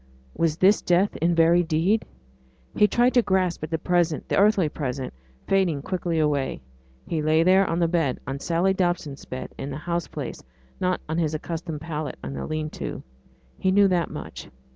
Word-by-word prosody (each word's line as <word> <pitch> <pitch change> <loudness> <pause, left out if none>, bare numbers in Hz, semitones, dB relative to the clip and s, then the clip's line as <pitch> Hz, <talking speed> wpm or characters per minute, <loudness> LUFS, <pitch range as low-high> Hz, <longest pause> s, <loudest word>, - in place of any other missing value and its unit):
Was 165 -2 +1
this 195 +4 +4
death 180 +3 +2
in 170 +1 +1
very 165 +1 +5
deed? 175 +6 +1 0.7
He 210 - +5
tried 240 +5 +3
to 245 - +5
grasp 185 -4 0
at 155 - -4
the 165 - 0
present, 175 -1 0
the - - +1
earthly 200 -4 +4
present, 135 -3 -4 0.3
fading 180 -8 +1
quick 185 +1 -4
away. 150 - 0 0.5
He 160 -2 -2
lay 155 +1 +3
there 190 +2 +4
on 165 - 0
the 170 -1 +2
bed 165 -6 0
on 135 +1 -4
Sally 170 +5 +1
Dobson's 175 -6 -2
bed 130 - -6
in 135 - -4
the 135 - -5
house 170 +2 -2
place, - - -6 0.4
not 185 0 0
on 160 +2 -1
his 155 -2 0
accustomed 160 -1 -5
pallet 155 -2 -4
in - - -5
the - - -5
lean 155 -1 -3
to. - - -6 0.6
He 190 - +1
knew 200 +1 +5
that 175 -2 +1
much. - - -8
170 Hz, 185 wpm, -25 LUFS, 155-185 Hz, 0.7 s, very